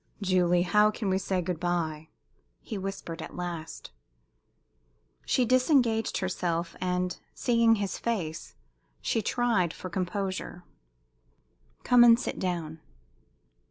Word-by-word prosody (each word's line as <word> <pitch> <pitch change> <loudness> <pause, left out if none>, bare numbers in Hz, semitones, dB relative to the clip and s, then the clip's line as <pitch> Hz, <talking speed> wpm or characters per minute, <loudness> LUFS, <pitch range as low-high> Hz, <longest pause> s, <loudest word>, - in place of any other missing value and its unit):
"Julie, 180 -3 +2
how 210 +4 +4
can 210 -2 -2
we 190 - +2
say 185 -1 -1
good 175 -2 -3
bye?" 160 -3 -2 0.5
he 225 - -7
whispered, 195 -4 -5
at - - -8
last. 170 - -6 1.4
She 255 - +2
disengaged 250 -3 +2
herself, 175 -2 -2
and, 180 0 -1 0.2
seeing 230 -1 +3
his 200 -2 -3
face, 175 -9 -3 0.4
she 225 - 0
tried 225 -9 +1
for 185 - -8
composure. 185 -1 -3 1.2
"Come 245 -1 +6
and 235 0 +7
sit - - -4
down." 165 -4 -3
185 Hz, 115 wpm, -28 LUFS, 175-225 Hz, 1.4 s, and